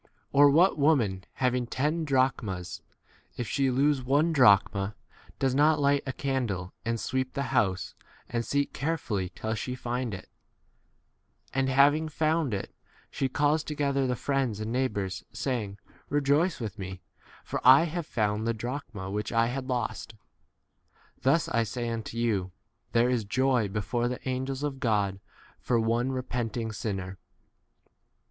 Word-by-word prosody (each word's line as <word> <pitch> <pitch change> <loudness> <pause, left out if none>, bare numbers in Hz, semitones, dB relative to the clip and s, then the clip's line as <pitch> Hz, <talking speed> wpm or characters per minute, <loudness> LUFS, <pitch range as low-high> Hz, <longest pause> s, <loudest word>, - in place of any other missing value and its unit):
Or, 145 +1 +7
what 165 +4 +4
woman 115 -11 +2
having 125 -2 0
ten 150 +7 -1
drachmas, 125 - 0 0.6
if 120 - -3
she 135 +2 +1
lose 135 +2 +2
one 145 +6 +2
drachma, 100 -5 +4 0.4
does 135 -2 +1
not 150 +3 +4
light 140 0 +3
a - - 0
candle 120 -10 -2
and 115 0 -1
sweep 130 +2 -2
the 140 - -2
h 140 - -2
house 100 -8 +1 0.3
and 120 0 -2
seek 140 +3 -1
carefully 130 - -2
till 110 0 -3
she 125 +3 -3
find 125 -3 -3
it? - - -10 1.3
9 135 0 +1
and - - 0
having 145 +4 +4
found 155 -2 +1
it, 100 -2 -4 0.4
she 135 - -1
calls 145 +3 +2
to 150 - -5
gether 140 -2 +1
the 125 - 0
friends 130 -4 -1
and 110 +1 -3
neighbours, 105 -7 -1
saying, 110 -7 -3 0.3
Eejoice 145 +5 +2
with 110 -2 -5
me, 95 -1 -7 0.4
for - - -4
I 130 +5 +8
have 170 -1 -3
found 105 -1 0
the 115 - 0
drachma 110 -5 -5
which 105 +1 -3
I 115 0 +3
10 120 - -2
had 130 -1 -4
lost. 120 -3 -3 1.1
Thus, 145 +5 +3
I 115 - +1
say 120 +2 -3
unto 115 0 -5
you, 105 -6 0 0.4
there 120 +2 +3
is 120 -3 +1
joy 130 +2 +2
1 100 - -5
before 120 +4 -1
the 125 +2 -5
angels 130 +2 -2
of 140 -2 -3
God 100 -5 0 0.4
for 120 -2 +1
one 115 +3 +1
repenting 120 -3 -3
sinner. 95 -3 -4
125 Hz, 155 wpm, -28 LUFS, 110-140 Hz, 1.3 s, I